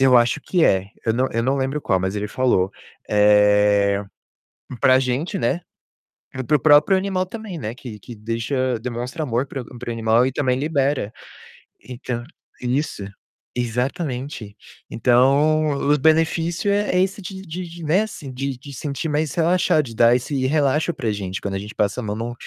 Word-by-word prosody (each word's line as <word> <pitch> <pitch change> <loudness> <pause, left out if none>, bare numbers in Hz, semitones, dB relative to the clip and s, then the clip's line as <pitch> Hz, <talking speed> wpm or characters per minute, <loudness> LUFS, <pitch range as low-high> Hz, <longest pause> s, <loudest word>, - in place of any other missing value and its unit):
Eu 130 -1 +6
acho 120 0 +3
que 175 -3 +1
é, 95 0 +3 0.2
eu 115 - +2
não 130 +2 +1
eu 115 - 0
não 135 +3 +1
lembro 135 +3 -1
qual, 95 -4 +1
mas 95 +2 -2
ele 105 0 -2
falou. 115 -8 +1 0.4
Eh, 105 -1 +4 0.8
pra 130 0 +5
gente, 135 +9 -2
né, 175 - 0 0.8
e 130 - -2
para 150 +4 +2
o - - -10
próprio 150 +6 +6
animal 190 -1 -1
também, 205 -3 -7
né, 110 -1 -5
que 120 -4 -9
que 120 +4 -10
deixa 115 +3 -2
demonstra 125 +6 -4
amor 125 -2 -1
para 135 -1 -5
o 125 +1 -12
para 125 - -6
o - - -2
animal 115 +1 +3
e 130 - 0
também 130 -1 0
libera. 140 -6 0 0.7
Então, 125 -1 -5 0.4
isso, 125 -3 -2 0.5
exatamente. 125 - -3 0.3
Então, 140 +6 +3 0.2
o 150 - +4
benefício 165 +5 +2
é 205 +1 +1
é - - +4
esse 195 +1 -3
de 190 0 -7
de 180 +1 -6
de, 170 0 -10
né, 160 +6 +3
assim, 150 -10 -8
de 135 +1 -4
de 140 +3 -11
sentir 140 +4 -4
mais 150 -1 -1
relaxado, 170 -2 +3
de 115 -3 -9
dar 120 +2 +5
esse 130 +1 -1
relaxo 150 +3 +1
pra 115 -7 -2
gente 95 -2 -4
quando 100 -1 -3
a - - -2
gente 105 +2 -9
passa 105 +4 0
a - - -7
mão 105 -1 -3
num 115 +2 -4
130 Hz, 185 wpm, -22 LUFS, 115-155 Hz, 0.8 s, Eu